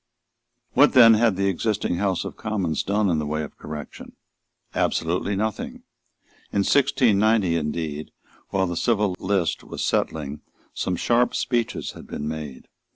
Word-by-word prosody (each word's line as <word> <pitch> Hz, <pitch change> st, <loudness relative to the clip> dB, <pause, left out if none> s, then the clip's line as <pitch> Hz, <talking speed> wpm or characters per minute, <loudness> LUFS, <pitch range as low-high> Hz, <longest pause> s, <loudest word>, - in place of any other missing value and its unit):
What 145 Hz, +3 st, +5 dB
then 115 Hz, -4 st, +9 dB
had 110 Hz, -2 st, +3 dB
the 100 Hz, +1 st, 0 dB
existing 100 Hz, -1 st, -1 dB
House 95 Hz, -1 st, 0 dB
of -, -, -6 dB
Commons 95 Hz, -7 st, -1 dB
done 105 Hz, +1 st, +1 dB
in 85 Hz, -4 st, +1 dB
the 75 Hz, -, -2 dB
way 75 Hz, +1 st, -2 dB
of 75 Hz, -, -9 dB
correction? 75 Hz, -1 st, -8 dB, 0.6 s
Absolutely 90 Hz, +4 st, 0 dB
nothing. 110 Hz, +1 st, -3 dB, 0.7 s
In 100 Hz, -, +1 dB
1690, 110 Hz, -, +3 dB
indeed, 75 Hz, -1 st, -3 dB, 0.4 s
while 95 Hz, -1 st, +1 dB
the 85 Hz, -1 st, -3 dB
Civil 105 Hz, -2 st, +1 dB
List 95 Hz, -3 st, 0 dB
was -, -, -4 dB
settling, 75 Hz, -1 st, -1 dB, 0.3 s
some 90 Hz, -, -2 dB
sharp 120 Hz, +7 st, +2 dB
speeches 120 Hz, -2 st, -1 dB
had -, -, -12 dB
been 75 Hz, -, -5 dB
made. 75 Hz, -4 st, -6 dB
95 Hz, 145 wpm, -24 LUFS, 80-110 Hz, 0.7 s, then